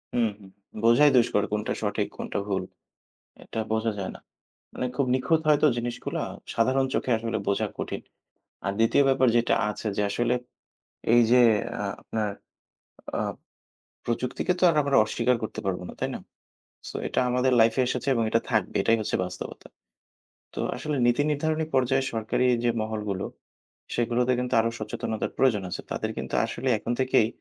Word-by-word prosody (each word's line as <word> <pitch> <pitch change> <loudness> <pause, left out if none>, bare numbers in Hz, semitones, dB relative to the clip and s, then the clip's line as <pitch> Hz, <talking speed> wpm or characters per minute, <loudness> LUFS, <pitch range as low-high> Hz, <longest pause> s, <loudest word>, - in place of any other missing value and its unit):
উমহু, 110 -4 0 0.4
বোঝাই 120 +6 +6
দুষ্কর 105 -3 +3
কোনটা 105 0 -1
সঠিক, - - -1
কোনটা - - -3
ভুল, 95 -2 -1 0.8
এটা 110 - -5
বোঝা 110 0 +1
যায় 95 - -3
না। - - -11 0.5
মানে 125 - -3
খুব 140 - +1
নিখুঁত 160 +5 +2
হয়তো, 150 0 +5
জিনিসগুলা 120 0 -3 0.3
সাধারণ 130 +4 +2
চোখে 125 - 0
আসলে 115 0 -2
বোঝা 100 - +1
কঠিন। - - -4 0.6
আর 100 - 0
২য় 115 +5 +4
ব্যাপার 130 -1 +3
যেটা 120 - +3
আছে 105 - -4
যে, - - +2
আসলে 120 +3 +1 0.8
এই 120 - +7
যে, 125 - +7 0.4
আ - - -1 0.2
আপনার 110 -2 -2 0.9
আ - - +1 0.8
প্রযুক্তিকে 125 +9 -1
তো - - +4
আর 155 - -1
আমরা 140 -1 +2
অস্বীকার 125 +3 +1
করতে 110 - -4
পারব 90 -2 -1
না, - - -8
তাই - - -1
না? - - -6 0.7
সো, - - -10
এটা - - 0
আমাদের 125 +1 +2
লাইফে 115 +3 +4
এসেছে 125 +1 -3
এবং 115 - +2
এটা 115 - +2
থাকবে, 110 -4 0
এটাই 115 +3 +3
হচ্ছে - - -1
বাস্তবতা। 90 0 -8 0.9
তো - - -5 0.2
আসলে 150 -2 -3
নীতি 120 +4 +3
নির্ধারণী 155 +2 0
পর্যায়ে 130 +1 +2
সরকারি 115 +3 0 0.2
যে, 120 - +3
মহলগুলো, 105 -3 -3 0.7
সেগুলোতে 120 +1 +1
কিন্তু 125 0 -2
আরো 115 - 0
সচেতনতার 110 0 -3
প্রয়োজন 115 -7 +3
আছে। - - -4
তাদের - - -2
কিন্তু - - -5
আসলে 130 +2 -3
এখন 120 - -2
থেকেই 130 -4 +3
120 Hz, 160 wpm, -26 LUFS, 110-130 Hz, 0.9 s, এই